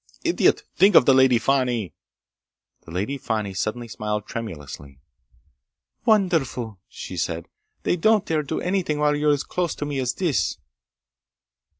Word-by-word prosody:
"Idiot! 340 0 +2
Think 195 -1 +5
of - - +8
the 135 - +6
Lady 130 -2 +5
Fani!" 120 - 0 0.9
The - - -13
Lady 105 +11 -2
Fani 105 -5 -2
suddenly 110 +5 -3
smiled 105 -1 -3
tremulously. 75 - -8 1.1
"Wonderful!" 160 - +1
she 90 - -8
said. 85 -1 -3 0.4
"They 175 - +1
don't 215 +3 +3
dare 155 -1 0
do 145 - -3
anything 180 -5 -1
while 150 0 +2
you're 150 +1 +1
as 145 -1 +1
close 175 -3 -2
to 145 - -4
me 145 -2 -3
as 125 -1 -1
this!" 170 -7 0
130 Hz, 140 wpm, -23 LUFS, 105-160 Hz, 1.1 s, of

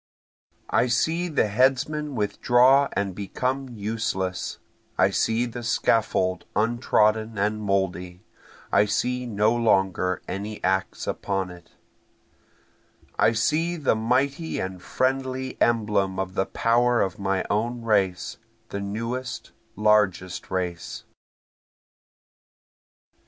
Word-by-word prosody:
I 125 - +3
see 160 +8 +1
the 155 -8 +1
headsman 135 +6 +1
withdraw 125 +5 +4
and 100 -1 -1
become 130 +7 -3
useless, 105 -4 -3 0.4
I - - +4
see 115 +2 +1
the 120 0 -6
scaffold 110 -5 +1
untrodden 110 -1 +2
and 105 +2 0
mouldy, 95 -3 -2 0.5
I 105 - +5
see 125 +4 -1
no 110 +1 +2
longer 95 -5 +1
any 105 +2 -4
axe 95 0 0
upon 95 -2 -2
it, 90 -1 -15 1.5
I 115 - +4
see 155 +9 +1
the 155 -5 +1
mighty 135 +8 0
and 95 -1 -4
friendly 130 +2 -1
emblem 105 -5 +2
of 95 -1 -3
the 95 0 0
power 120 +1 +2
of 95 -1 -1
my 95 -1 0
own 115 +3 -1
race, 95 -5 0 0.3
the 100 - -4
newest, 115 +4 -4 0.3
largest 105 -4 +1
race. 90 -2 -4
110 Hz, 105 wpm, -25 LUFS, 95-125 Hz, 1.5 s, I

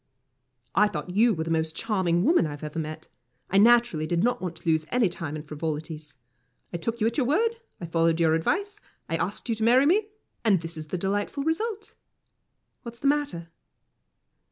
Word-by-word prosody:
"I 210 +1 +5
thought 185 - -5
you 220 +3 +3
were 160 - -2
the 165 - -4
most 160 0 0
charming 185 -6 0
woman 320 - +4
I 145 -1 -6
have 145 - -15
ever 155 +2 -3
seen. 155 +1 -6 0.5
I 195 - +5
naturally 235 -8 +4
did 170 +2 0
not 245 +1 +1
want 180 -2 -4
to 165 - -13
lose 160 -1 +3
any 245 -4 +3
time 165 -4 -5
in 150 - -6
frivolities. 155 -1 -5 0.6
I - - -1
took 230 +7 -3
you 215 - +1
at 230 +1 0
your 250 - +1
word, 450 - +1 0.2
I 175 - -5
followed 165 0 +1
your 160 -1 +3
advice, 400 - -1 0.3
I - - -1
asked - - -3
you 230 - +1
to 220 0 -3
marry 250 +4 +5
me, 405 +7 +3 0.4
and 205 -5 +4
this 165 0 -7
is 155 -1 -7
the 185 - -3
delightful 205 +9 -2
result 415 +7 -2 0.9
what's 235 -1 -9
the 275 - -10
matter?" 275 - 0
190 Hz, 200 wpm, -26 LUFS, 160-240 Hz, 0.9 s, I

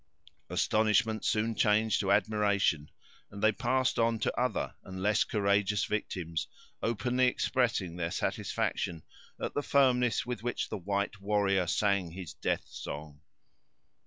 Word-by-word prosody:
Astonishment 110 0 +2
soon 110 +1 +1
changed 110 0 +2
to 100 -1 0
admiration, 100 -6 +2 0.4
and 100 - -9
they 110 - +6
passed 130 +4 0
on 115 0 +2
to - - 0
other 125 +3 -1
and 95 0 -8
less 105 +2 +3
courageous 100 -1 +1
victims, 85 -6 -3 0.3
openly 125 +3 +1
expressing 115 -9 0
their 85 -1 -1
satisfaction 85 -1 -2 0.4
at - - -3
the 145 - 0
firmness 125 -5 +3
with 125 -1 -4
which 120 +1 -2
the - - -3
white 100 +2 -2
warrior 100 -2 +1
sang 100 -2 +1
his 90 -1 -8
death - - -2
song. 75 0 -8
105 Hz, 130 wpm, -30 LUFS, 95-115 Hz, 0.4 s, they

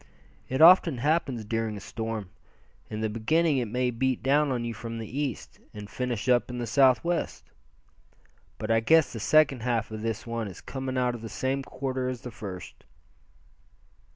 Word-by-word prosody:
"It 130 +4 +3
often 170 -4 +7
happens 135 -4 0
during 115 -1 -2
a - - -6
storm. 110 -2 -5 0.6
In 110 0 -4
the 110 - +1
beginning 135 +8 +1
it 120 - -2
may 125 +3 0
beat 130 +1 -1
down 145 +2 +3
on 120 -2 -1
you 115 - -3
from 115 +1 -6
the 115 - -5
east, 140 -5 -4 0.2
and 105 -1 -7
finish 120 +1 -3
up 125 -1 +3
in 125 - -5
the 120 - -2
southwest. 135 +7 +1 1.1
But 110 +1 -3
I 115 - +4
guess 160 +7 +4
the 115 - -5
second 145 +1 +4
half 115 -2 -1
of 110 0 -6
this 115 -1 -3
one 115 -2 -3
is 95 - -9
coming 130 -1 -5
out 125 -1 +1
of 120 - -7
the 115 - -7
same 130 +6 -1
quarter 130 -1 -3
as 125 -2 -5
the 125 - -7
first." 95 -4 -9
120 Hz, 180 wpm, -27 LUFS, 115-130 Hz, 1.1 s, often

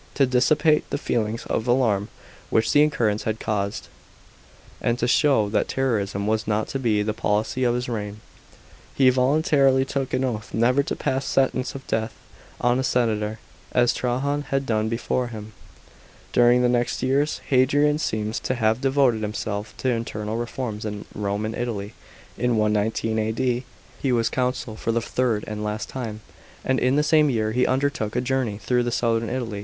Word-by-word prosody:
To 140 - +4
dissipate 145 +5 +2
the - - -1
feelings 115 0 -2
of 115 - -2
alarm 115 -5 +2 0.4
which 110 0 +2
the 145 - +6
occurrence 115 -9 +1
had 110 0 -1
caused, 100 -2 -2 0.9
and 120 - +1
to 120 - 0
show 130 -4 +3
that 105 - +1
terrorism 105 -7 -1
was 110 0 0
not 105 0 0
to 135 - -3
be 110 -5 +1
the 105 0 -1
policy 105 +4 -1
of 120 0 +2
his 125 +1 -2
reign, 105 -3 -4 0.8
he 130 -2 +5
voluntarily 135 0 +3
took 135 -1 -3
an 130 - 0
oath 110 -5 -3
never 125 +5 +3
to - - -3
pass 135 +1 -1
sentence 130 0 0
of 135 - -8
death 110 -1 -2 0.4
on 120 +1 +2
a - - 0
senator, 110 -4 0 0.4
as 120 -1 +3
Trajan 135 +4 -1
had 135 0 0
done 110 -2 0
before 120 +2 -1
him. 110 -2 -9 0.8
During 120 +1 +5
the - - +4
next 120 0 0
years, 140 +3 +1
Hadrian 145 +3 +3
seems 110 -4 -2
to 130 - -2
have 110 0 +1
devoted 135 -4 +2
himself 105 0 -4
to 130 - -1
internal 110 -2 -3
reforms 115 -2 -4
in 105 -1 -5
Rome 100 +1 -2
and 110 - -3
Italy. 110 -4 -4 0.5
In 125 -1 +1
119 110 +1 +1
A.D. 120 +3 -1 0.4
he 135 - +1
was 115 -2 +2
consul 125 -3 -2
for 115 - -2
the 115 - +1
third, 115 -2 -1
and 105 0 -5
last 105 0 -3
time, 110 -5 -5 0.4
and 130 0 +2
in 130 +2 +2
the 150 - +3
same 150 -1 +4
year 110 -4 0
he 125 +3 +2
undertook 130 -5 -1
a 125 - +1
journey 125 -5 -1
through 120 +2 0
southern 115 -1 0
Italy. 115 -5 -3
120 Hz, 175 wpm, -24 LUFS, 110-130 Hz, 0.9 s, the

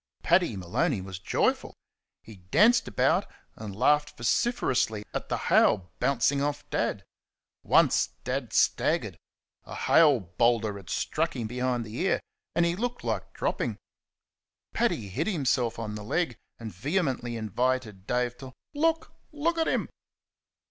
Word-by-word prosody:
Paddy 175 - +3
Maloney 110 - 0
was 95 -1 -7
joyful. 95 - 0 0.5
He 110 -3 -12
danced 205 - +3
about - - +2 0.3
and 105 -3 -8
laughed 150 +6 +2
vociferously 120 - 0
at - - -4
the - - 0
hail 95 -4 +3
bouncing 140 +1 +2
off 145 0 -2
Dad. - - -1 0.6
Once - - +4 0.2
Dad - - -3
staggered - - +1 0.4
a - - -9
hail 150 -6 +5
boulder 110 +4 +1
had 95 -3 -12
struck 160 0 -1
him 120 -3 -3
behind 125 +1 -1
the 110 +1 -9
ear 190 +5 +1 0.4
and 170 - +3
he 170 0 0
looked 245 +4 -3
like - - -3
dropping. - - -2 1.0
Paddy 225 - 0
hit 135 - -2
himself 135 - 0
on 110 -2 -4
the 105 0 -6
leg, 145 +3 -1 0.2
and 110 -3 -8
vehemently 130 - -1
invited 110 -2 -2
Dave 125 0 0
to 130 -1 -10 0.2
"Look, 320 +2 0 0.2
LOOK 325 +3 -1
at 325 - +1
him!" - - 0
125 Hz, 140 wpm, -28 LUFS, 110-165 Hz, 1.0 s, hail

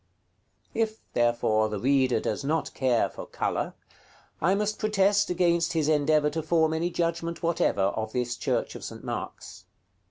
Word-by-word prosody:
If, 220 -1 -1
therefore, 115 -2 +2
the 105 -1 -3
reader 130 0 +3
does 110 +4 -3
not 150 0 -1
care 125 -3 +2
for - - -9
color, - - -2 0.7
I 185 +5 +3
must 210 +1 -1
protest 205 -1 +2
against 170 -1 +2
his 160 -3 +1
endeavor 150 0 +3
to 160 +2 -2
form 160 0 +2
any 165 +2 0
judgment 170 -1 -2
whatever 165 -11 +1
of 110 +3 -1
this 125 0 -1
church - - -1
of - - -9
St. - - -8
Mark's. - - -6
155 Hz, 155 wpm, -27 LUFS, 125-170 Hz, 0.7 s, reader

